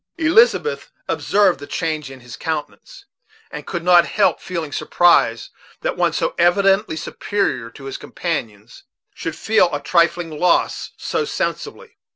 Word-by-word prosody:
Elizabeth 445 +7 +2 0.2
observed 195 -7 +2
the 145 - -9
change 155 -4 -3
in 135 -1 -12
his 120 -1 -10
countenance, 160 - -6 0.5
and - - -8
could 170 -2 -4
not 175 -1 +5
help 210 - +1
feeling 165 -5 -5
surprise 145 -8 +2 0.3
that - - -2
one - - +1
so - - -1
evidently 195 +2 +3
superior 170 - -2
to 135 - -14
his 135 0 -6
companions 115 - -5 0.3
should 165 -1 -5
feel 220 -5 +2
a 145 - -2
trifling 170 +2 +1
loss 180 -1 +1
so 455 - -2
sensibly. 460 +1 -5
170 Hz, 140 wpm, -20 LUFS, 145-200 Hz, 0.5 s, not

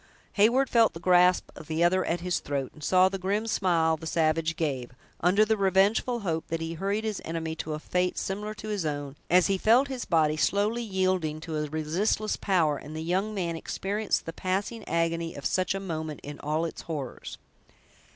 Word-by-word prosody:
Heyward 235 +6 +4
felt 230 -3 +4
the 165 - -8
grasp 180 +1 +4
of 155 - -11
the 160 +1 0
other 185 +2 +3
at 170 0 -1
his 180 0 0
throat, 140 -2 -3
and 155 - -13
saw 185 +4 +5
the 195 0 -3
grim 200 +4 -1
smile 170 -7 +2
the 160 +1 -8
savage 160 0 +1
gave, 135 -6 -2 0.3
under 195 +5 +4
the 220 +1 +2
revengeful 200 +5 +2
hope 165 -5 -1
that 165 - -2
he 165 0 -4
hurried 200 +5 -1
his 215 -2 -3
enemy 165 -1 -3
to 155 0 -3
a - - -6
fate 180 +3 -1
similar 210 +2 -3
to 215 - -7
his 205 -4 -1
own, 145 -2 -3
as 180 +1 +5
he 195 -1 +1
felt 245 +7 +4
his 260 -3 -4
body 155 -3 +2
slowly 205 +7 +1
yielding 185 -7 0
to 160 -1 -5
a 150 -1 -2
resistless 170 +8 0
power, 165 -7 +1
and 155 +2 -9
the 160 - -4
young 190 +6 -1
man 170 -4 -2
experienced 200 +5 -2
the 165 - -5
passing 200 +6 -2
agony 165 0 -1
of 140 - -8
such 185 +1 +1
a - - -2
moment 160 -5 -4
in 145 0 -8
all 155 +3 -1
its 165 - -6
horrors. 140 -6 -5
180 Hz, 200 wpm, -27 LUFS, 160-200 Hz, 0.3 s, saw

